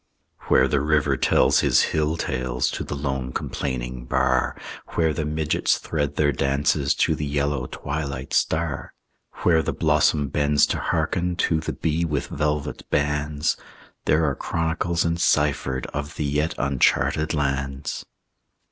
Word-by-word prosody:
Where 65 Hz, -, +5 dB
the 70 Hz, 0 st, +1 dB
river 75 Hz, -2 st, +2 dB
tells 65 Hz, +1 st, +3 dB
his -, -, +4 dB
hill 80 Hz, +1 st, +1 dB
tales 65 Hz, -4 st, -1 dB
To -, -, -4 dB
the -, -, -5 dB
lone 65 Hz, -2 st, -3 dB
complaining 60 Hz, -2 st, -4 dB
bar, 65 Hz, 0 st, +1 dB, 0.4 s
Where 80 Hz, -2 st, +2 dB
the 80 Hz, -1 st, -2 dB
midgets 75 Hz, 0 st, +1 dB
thread 75 Hz, -3 st, -2 dB
their 75 Hz, -1 st, +3 dB
dances 70 Hz, +1 st, +1 dB
To -, -, +2 dB
the 75 Hz, -, -3 dB
yellow 70 Hz, -2 st, -1 dB
twilight 70 Hz, -3 st, -5 dB
star, 80 Hz, -3 st, 0 dB, 0.5 s
Where 80 Hz, -2 st, +4 dB
the -, -, -2 dB
blossom 70 Hz, -3 st, +2 dB
bends 75 Hz, +1 st, +3 dB
to -, -, -3 dB
hearken 90 Hz, 0 st, 0 dB
To 80 Hz, -2 st, +1 dB
the 80 Hz, -, -4 dB
bee 80 Hz, +1 st, -1 dB
with 75 Hz, -4 st, -2 dB
velvet 75 Hz, 0 st, -2 dB
bands, 75 Hz, 0 st, 0 dB, 0.5 s
There 80 Hz, +1 st, +3 dB
are 70 Hz, -, +1 dB
chronicles 80 Hz, +3 st, -1 dB
enciphered 75 Hz, -5 st, +1 dB
Of 75 Hz, +2 st, -4 dB
the 75 Hz, -, -2 dB
yet 75 Hz, +3 st, 0 dB
uncharted 70 Hz, +3 st, +1 dB
lands. 70 Hz, -1 st, -2 dB
75 Hz, 140 wpm, -24 LUFS, 70-80 Hz, 0.5 s, Where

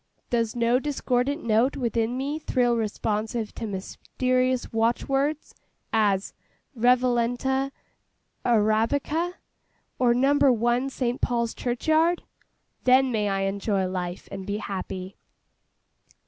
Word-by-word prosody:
Does 230 Hz, -2 st, 0 dB
no 240 Hz, +1 st, +3 dB
discordant 280 Hz, 0 st, -1 dB
note 235 Hz, +4 st, +2 dB
within 235 Hz, -1 st, -1 dB
me 285 Hz, +4 st, -2 dB
thrill 245 Hz, -5 st, +1 dB
responsive 220 Hz, 0 st, -2 dB
to 225 Hz, -, -5 dB
mysterious 255 Hz, +6 st, -1 dB
watchwords, 270 Hz, +6 st, 0 dB, 0.4 s
as 205 Hz, -3 st, +2 dB, 0.4 s
'Revalenta 250 Hz, +2 st, +2 dB, 0.7 s
Arabica,' 245 Hz, +10 st, +1 dB, 0.6 s
or 240 Hz, -2 st, +4 dB
'Number 275 Hz, +2 st, +4 dB
One 240 Hz, +3 st, +1 dB
St. 250 Hz, -2 st, -2 dB
Paul's 235 Hz, -1 st, 0 dB
Churchyard'? 315 Hz, +8 st, +1 dB, 0.6 s
Then 260 Hz, +1 st, +5 dB
may 210 Hz, -3 st, 0 dB
I 195 Hz, 0 st, 0 dB
enjoy 195 Hz, 0 st, 0 dB
life, 180 Hz, -1 st, -4 dB
and 195 Hz, -1 st, -6 dB
be 205 Hz, 0 st, -1 dB
happy. 190 Hz, -2 st, -5 dB
240 Hz, 105 wpm, -25 LUFS, 215-265 Hz, 0.7 s, Then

